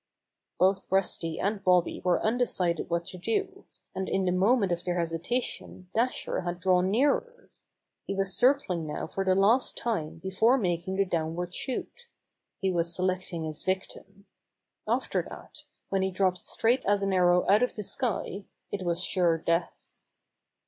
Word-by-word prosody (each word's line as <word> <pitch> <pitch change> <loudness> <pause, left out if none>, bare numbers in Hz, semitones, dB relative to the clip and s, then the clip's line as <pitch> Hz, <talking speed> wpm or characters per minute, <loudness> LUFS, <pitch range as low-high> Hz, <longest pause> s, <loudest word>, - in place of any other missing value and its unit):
Both 190 +1 +2
Rusty 175 -4 0
and 200 0 -1
Bobby 180 -2 +2
were 180 -1 +1
undecided 215 -8 0
what 170 0 -1
to 185 0 -9
do, 390 - -2 0.3
and 190 0 -3
in 190 -1 0
the 180 - +2
moment 195 +2 +3
of 170 0 -1
their 180 -1 -1
hesita 170 +9 -1
tion 180 -1 -8
Dasher 240 +3 0
had 175 0 -4
drawn 180 0 +3
nearer. 295 - 0 0.6
He 195 - -2
was 195 -1 0
cir 255 +3 +6
cling 180 - -4
now 150 - -4
for 195 - -3
the 185 -1 +3
last 215 +7 +3
time 165 -10 -2
before 190 +9 +2
making 180 -3 -1
the 195 0 +2
downward 175 0 -2
shoot. 475 - -4 0.5
He 190 -1 0
was 170 -1 0
selecting 185 -2 -2
his 155 -1 -5
victim. 190 +1 -4 0.6
After - - 0
that, - - -11 0.2
when 195 -1 +1
he 190 - +1
dropped 185 -1 +1
straight 245 +3 +1
as 200 0 +2
an 195 -1 0
arrow 180 -1 +4
out 205 +3 +5
of 250 - 0
the 210 - -4
sky, 200 -3 -2 0.3
it 200 - -3
was 175 0 0
sure 175 -4 +2
death. 170 +1 -2
190 Hz, 165 wpm, -28 LUFS, 175-210 Hz, 0.6 s, cir